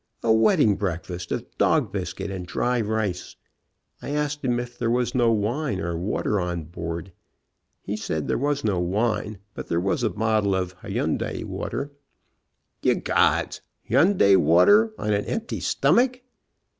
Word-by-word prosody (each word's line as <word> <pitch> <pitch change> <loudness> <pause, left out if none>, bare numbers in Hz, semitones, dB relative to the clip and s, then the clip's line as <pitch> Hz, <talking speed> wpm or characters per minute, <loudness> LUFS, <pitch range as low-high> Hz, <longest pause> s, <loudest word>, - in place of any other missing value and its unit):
A 115 - +4
wedding 110 -2 +4
breakfast 90 -2 -4
of - - -2
dog - - +2
biscuit - - -4
and 90 -2 -6
dry 125 +5 0
rice. 105 -4 -2 0.7
I - - -6
asked 145 0 -2
him 120 -2 +1
if 120 0 -6
there 120 - -1
was 120 0 0
no 120 -2 +3
wine 110 +1 -1
or 85 -1 -2
water 100 +3 -1
on 90 -2 -3
board. 85 +2 -6 0.7
He 100 - -3
said 80 -8 -3
there - - +1
was 145 +1 0
no 100 -4 +1
wine, 105 +3 -1 0.2
but - - -7
there 85 - 0
was 100 +8 0
a 115 - +2
bottle 105 -1 +1
of 90 -1 -2
Hunyadi - - -2
water. 140 +2 -4 0.9
Ye - - +3
gods! - - +1 0.3
Hunyadi 135 - +5
water 95 - +5
on 105 0 -1
an 100 0 0
empty 230 +1 -3
stomach. 250 0 +2
105 Hz, 155 wpm, -24 LUFS, 90-125 Hz, 0.9 s, Hunyadi